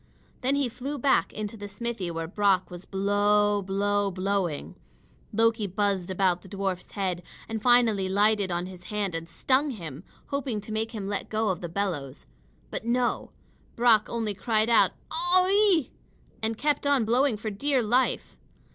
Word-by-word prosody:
Then 265 +2 +2
he 280 -2 +1
flew 260 +5 -5
back 270 +1 +2
into 215 +1 -5
the 205 -1 -7
smithy 205 -2 -4
where 165 -1 -3
Brock 195 0 +1
was 175 +1 -9
blow 205 +1 +2
blow 200 +1 0
blowing. 185 -4 -2 0.6
Loki 225 -1 +2
buzzed 195 -1 -1
about 185 -1 +1
the 190 - -14
dwarf's 190 -2 -3
head, 185 -3 -2 0.3
and 225 -1 -4
finally 230 -6 +4
lighted 205 0 +2
on 175 +1 -1
his 180 -1 -11
hand 205 -3 -2
and 165 0 -5
stung 270 - +1
him, 165 - -7 0.3
hoping 270 -6 -2
to 205 - -8
make 220 +1 -2
him 205 -3 -4
let 200 0 -3
go 215 -2 +1
the 175 -1 -6
bellows. 165 -8 -3 0.5
But - - -4
no! 240 +1 0 0.5
Brock 230 -3 +4
only 225 -3 -2
cried 215 +3 0
out, 230 - +5 0.2
"Oh 350 +3 +3
ee!" 400 - +3 0.5
and 220 0 -1
kept 295 +1 0
on 275 -5 +3
blowing 245 +1 +2
for 215 +1 -4
dear 260 +5 +1
life. 245 +4 +1
210 Hz, 165 wpm, -27 LUFS, 190-235 Hz, 0.6 s, out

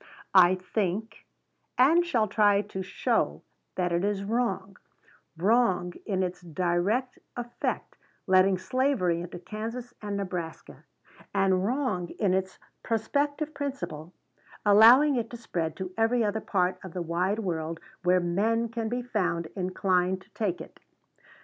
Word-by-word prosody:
"I 185 -1 +7
think, 195 +3 -3 0.5
and 315 +7 +5
shall 240 -11 +1
try 205 0 +3
to 190 -2 -6
show, 185 - -1 0.3
that 180 -1 0
it 170 +1 +1
is 200 -1 0
wrong, 200 -4 -2 0.6
wrong 190 -2 +2
in 190 -3 0
its 180 0 -4
direct 180 - -1 0.2
effect, 240 0 -4 0.3
letting 185 0 +4
slavery 185 -7 0
into 175 0 -7
Kansas 225 +7 -6
and 205 -1 -3
Nebraska, 180 -4 -6 0.5
and 190 -1 +3
wrong 220 -6 -1
in 200 -4 +2
its 190 0 -1 0.2
prospective 285 +7 -1
principle, 260 - -5 0.5
allowing 240 +8 +7
it 230 -1 -2
to 240 - -8
spread 165 -8 -3
to 185 -1 -6
every 225 +1 +2
other 215 +1 -1
part 180 -3 0
of 185 -3 -9
the 180 - -2
wide 180 +5 0
world 165 -5 -3 0.2
where 180 +1 +3
men 215 +7 0
can 225 -1 -3
be 245 +1 -2
found 180 -8 -1
inclined 185 0 0
to 195 - -29
take 190 -5 -1
it. - - -12
195 Hz, 135 wpm, -28 LUFS, 180-230 Hz, 0.6 s, I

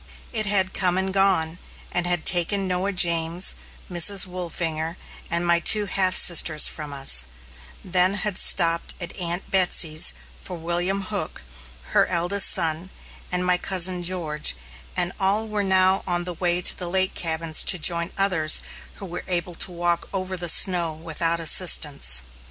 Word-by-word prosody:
It 215 -2 0
had 190 -2 +1
come 180 -1 -1
and 190 0 -3
gone, 180 -4 0 0.3
and 175 0 -1
had 175 -2 -2
taken 190 +3 +2
Noah 185 +2 -3
James, 170 -1 +1 0.3
Mrs. 190 +2 +3
Wolfinger, 170 -2 -5 0.3
and 170 +1 -2
my 170 0 +1
two 210 +5 +3
half 185 -1 0
sisters 160 -3 +5
from 150 -2 -8
us; 135 - +4 0.6
then 185 +1 0
had 205 -2 -2
stopped 170 -2 +2
at 175 -2 -7
Aunt 175 +1 -5
Betsy's 165 - +2 0.3
for 180 - -9
William 175 +4 -3
Hook, - - -6 0.5
her - - +2
eldest 180 +3 +3
son, 165 0 +3 0.4
and 180 0 -1
my 180 0 +1
Cousin 185 -1 +1
George, 165 - 0 0.4
and 175 - -1
all 200 +3 -1
were 210 -1 -4
now 190 -1 +1
on 175 -1 -1
the 180 0 -6
way 175 +1 -1
to - - +3
the 180 -2 -6
lake 190 +1 0
cabins 160 -1 -1
to 185 - +4
join 170 +1 0
others 180 -6 +1 0.3
who 195 - -9
were 175 -2 -8
able 175 -1 -4
to 180 - -2
walk 175 0 -3
over 185 -1 -5
the 175 -1 0
snow 175 -2 +4
without 165 +1 -3
assistance. 150 - +1
175 Hz, 155 wpm, -21 LUFS, 165-190 Hz, 0.6 s, sisters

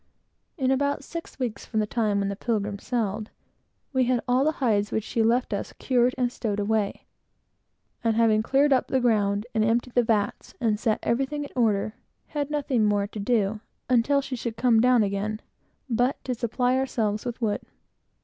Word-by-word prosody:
In 265 -3 +1
about 280 +1 0
six 335 +3 -8
weeks 235 -6 -3
from 220 - -2
the 215 - +2
time 210 -2 0
when 200 0 0
the 200 - -3
Pilgrim 205 -2 -2
sailed, 215 -3 -2 0.6
we 260 -1 +3
had 250 0 +2
got - - -5
all 250 +2 +3
the 310 +2 +2
hides 210 -8 +1
which 220 - -1
she 225 - -1
left 235 +1 +2
us 200 - -4
cured 250 -1 +1
and 245 -1 +1
stowed 210 -4 -3
away; 210 0 -1 1.0
and 225 -1 +2
having 220 -2 +4
cleared 275 +5 +3
up 255 - +2
the 265 - +1
ground, 210 -4 +1
and 220 -1 +2
emptied 235 +2 +1
the 245 - +4
vats, 215 -3 -1
and 220 -4 +1
set 220 -2 +1
everything 270 +5 0
in 285 - -8
order, 215 -4 +1 0.4
had 290 -2 -2
nothing 280 -6 0
more 205 -1 +2
to 210 +1 -8
do 210 -1 +1 0.3
until 255 +4 +3
she 270 -1 -5
should 230 -1 -5
come 235 -3 +4
down 250 -2 +5
again, 205 +2 -2 0.5
but 245 +2 +1
to 255 - -2
supply 245 +2 0
ourselves 215 -5 -1
with 240 -1 -5
wood. 215 -4 0
230 Hz, 190 wpm, -26 LUFS, 210-255 Hz, 1.0 s, down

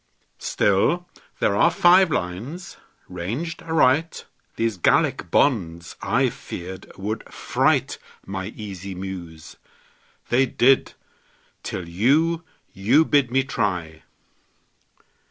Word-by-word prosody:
Still, 150 - +1 0.3
there 100 - +2
are 165 +11 +5
five 175 +2 +5
lines 120 - -4 0.3
ranged 115 - -5
aright. 160 0 +1 0.3
These 115 -3 -1
Gallic 85 - +2
bonds, 85 - +1
I - - +2
feared, 95 +2 -8
would 105 +4 -5
fright - - 0 0.3
My 95 -1 -5
easy 100 -3 -7
Muse. 90 -4 -8 0.7
They 130 +2 +3
did, 130 +2 +3 0.7
till 90 - -5
you 150 - +2 0.3
You 110 +12 +3
bid 140 -5 +3
me 135 +2 +2
try! 90 -11 -2
105 Hz, 100 wpm, -23 LUFS, 90-145 Hz, 0.7 s, are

